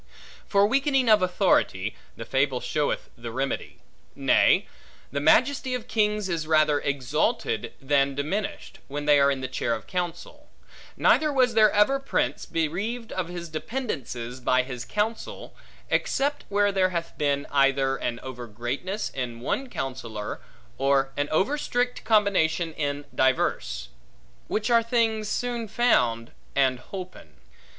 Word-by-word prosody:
For 200 0 +4
weakening 270 +2 +2
of 215 -2 +6
authority; 180 - +1 0.2
the 115 - -7
fable 135 0 +1
showeth 150 +2 -2
the 115 -1 -7
remedy. 135 +3 -3 0.4
Nay, - - +4 0.5
the 140 - -1
majesty 255 - +3
of 245 -1 -6
kings, 210 -3 +1
is 165 -4 -2
rather 155 -2 +4
exalted 145 - -1
than 140 0 +2
diminished, 185 +9 -3
when 145 +1 -5
they 145 -1 +6
are 140 0 +5
in 135 -1 -1
the 130 - -3
chair 120 -2 -1
of 110 -2 -9
counsel; 175 -2 -5 0.5
neither 305 -1 +4
was 255 -4 +3
there 215 -1 +6
ever 210 +7 +3
prince, 270 - -1
bereaved 200 +9 -2
of 185 -2 -2
his 175 -1 -6
dependences, 155 - -4
by 130 0 +2
his 125 -2 -6
counsel, 215 +2 -3 0.4
except 285 +1 0
where 205 0 +2
there 190 -1 +2
hath 170 -2 -4
been, 140 -1 +1
either 135 -1 +3
an 120 -3 -3
over 125 -2 -7
greatness 135 - -4
in 120 -3 -4
one 260 - -2
counsellor, 120 - -5 0.4
or 135 0 +2
an 145 0 -1
over 205 - +1
strict 245 -2 -1
combination 185 -6 +2
in 145 -1 -3
divers; 60 - 0 0.6
which 215 +3 -1
are 235 -1 +6
things 225 -2 0
soon 240 -1 -2
found, 120 - +2 0.2
and 130 -2 +2
holpen. 185 - -8
160 Hz, 140 wpm, -26 LUFS, 135-215 Hz, 0.6 s, of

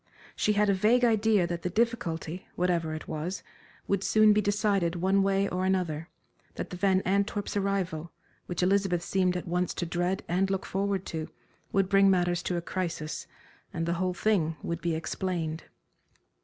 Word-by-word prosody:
She 210 - +2
had 210 0 +3
a 200 - +4
vague 220 +6 +4
idea 220 -4 +3
that 170 0 -3
the 180 - -2
difficulty, 180 -6 -1
whatever 170 -3 0
it 155 - -8
was, 165 +5 -4 0.4
would 200 -1 0
soon 215 0 +5
be 210 - +3
decided 200 -4 +1
one 190 +3 +2
way 195 0 +2
or 185 -1 -2
another, 175 -4 -1 0.5
that - - -5
the - - -4
Van 190 0 +2
Antwerps' 200 +2 0
arrival, 190 -5 -1 0.4
which 175 0 -2
Elizabeth 190 -2 +2
seemed 185 -1 +1
at 180 - -6
once 180 +1 -1
to 175 - -2
dread 175 +2 -1
and 185 +3 +1
look 195 -1 -1
forward 195 0 -1
to, 160 -1 -4 0.4
would 195 -1 +2
bring 195 0 +5
matters 175 -2 +2
to 180 - -2
a - - -1
crisis, 170 -4 -4 0.4
and 165 - -2
the 170 - 0
whole 185 -1 0
thing 170 -8 +1
would 170 0 -3
be 170 -2 0
explained. 165 -1 -3
185 Hz, 175 wpm, -28 LUFS, 170-200 Hz, 0.5 s, soon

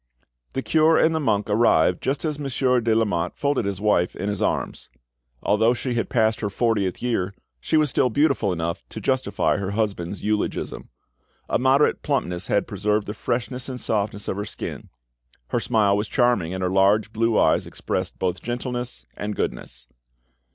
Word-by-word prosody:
The 135 - -2
cure 160 0 +4
and 160 - +4
the 160 - 0
monk 105 -8 +1
arrived 105 -5 +3
just 135 +4 -1
as 150 -2 -2
Monsieur 130 -3 +1
de 115 -1 +2
Lamotte 90 -6 0
folded 140 -6 0
his 100 -2 -2
wife 100 -4 +2
in 100 +3 -3
his 105 - -3
arms. - - -2 0.5
Although 110 +4 +3
she 125 +1 -3
had 115 -4 -1
passed 110 -2 +2
her 105 - -2
fortieth 105 -3 0
year, 100 -6 -1 0.2
she 155 - +1
was 150 -3 +2
still 125 - +2
beautiful 135 -5 +2
enough 85 -1 -3
to - - -7
justify 130 -1 0
her 100 -2 -3
husband's 100 -4 -2
eulogism. 105 0 -2 0.6
A - - +1
moderate 135 +3 +3
plumpness 90 -11 -1
had 100 - +1
preserved 105 0 0
the 105 - -4
freshness 125 +3 -3
and 130 -1 -5
softness 105 -2 -2
of 95 - -2
her 100 - -2
skin; - - -7 0.6
her - - +1
smile 105 -4 +2
was 105 +1 -1
charming, 120 -10 +2
and 95 0 -3
her 90 - 0
large 100 +3 +3
blue 115 0 +1
eyes - - +3
expressed - - -3
both 90 -2 -2
gentleness 125 0 -4
and 105 0 -4
goodness. - - -4
110 Hz, 175 wpm, -23 LUFS, 100-125 Hz, 0.6 s, cure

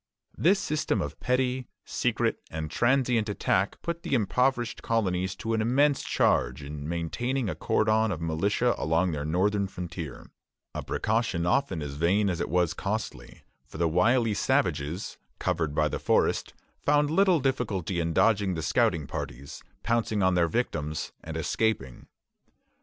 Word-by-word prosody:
This 190 +5 +4
system 155 - -1
of 75 -4 -4
petty, 125 0 0 0.2
secret, - - 0
and 80 0 -5
transient 120 -2 +2
attack 100 -1 0
put 170 -1 -3
the - - 0
impoverished 120 +1 +1
colonies 95 -5 0
to 115 - -3
an 110 - +1
immense 135 +5 +3
charge 65 +4 +1
in 75 +1 -6
maintaining 95 - -2
a - - -1
cordon 110 0 +1
of 85 - -3
militia 100 +9 +1
along 85 +3 +1
their 75 -2 -3
northern 100 +5 +1
frontier, 85 -6 -7 0.4
a - - -3
precaution 110 -6 -1
often 90 - +1
as 70 -1 -5
vain 95 +7 +2
as 85 - -3
it - - -2
was 90 0 +2
costly; - - -5 0.2
for - - -10
the 85 +1 +2
wily 110 +7 +3
savages, 80 -1 -1 0.2
covered 80 -3 -1
by - - +3
the - - -3
forest, - - +1 0.3
found 145 0 +2
little 185 -1 +4
difficulty 105 - -1
in 85 0 0
dodging 100 0 +2
the 80 - -3
scouting 90 - +2
parties, 70 +1 -6 0.2
pouncing 115 -3 +1
on 95 0 +4
their 85 -1 +3
victims, 80 -7 -2
and 80 0 -5
escaping. 80 - -1
100 Hz, 150 wpm, -27 LUFS, 80-120 Hz, 0.4 s, This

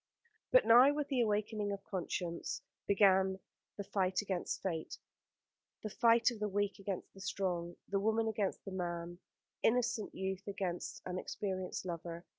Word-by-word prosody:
But - - +6
now, 250 +5 +8
with 295 -1 -2
the 260 -3 +2
awakening 210 -1 0
of 200 0 -5
conscience, 175 -3 -3 0.2
began 190 -1 +4 0.4
the 200 - -3
fight 190 -2 0
against 190 -3 -3
Fate, 165 -4 -3 0.9
the 215 - -4
fight 230 +1 +4
of 230 - -7
the 210 0 -1
weak 205 +1 -1
against 195 -1 -5
the 195 - -12
strong, 180 -2 -2
the 195 - 0
woman 220 +2 +2
against 210 -3 -1
the 195 - -6
man, 175 -1 -4 0.4
innocent 230 -2 +1
youth 190 +1 -3
against 190 -3 -3
an 185 0 -3
experienced 185 -2 -4
lover. 170 -1 -5
195 Hz, 150 wpm, -35 LUFS, 185-215 Hz, 0.9 s, now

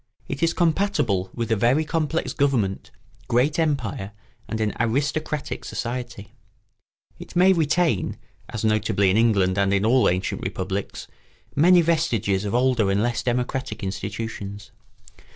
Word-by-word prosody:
It 140 - -5
is 165 0 +2
compatible 165 - +1
with 115 -2 -4
a - - +4
very 125 +9 +2
complex 160 0 -1
government, 125 -10 0 0.4
great 135 +7 +2
empire, 125 -10 -1 0.3
and 110 - -4
an 110 -1 0
aristocratic 145 +5 -1
society; 120 -4 -5 0.9
it - - -11
may 185 +2 +6
retain, 160 - +1 0.3
as 110 -1 -3
notably 105 -3 +2
in - - +1
England 100 -5 +3
and 100 0 +2
in 100 +1 +2
all 125 +3 +4
ancient 90 +1 -2
republics, 95 +1 -4 0.5
many 175 +4 +6
vestiges 120 - +1
of 105 - -2
older 125 -5 +2
and 100 +2 +1
less 120 -1 0
democratic 125 0 -2
institutions. 100 +1 -5
120 Hz, 135 wpm, -23 LUFS, 100-150 Hz, 0.9 s, may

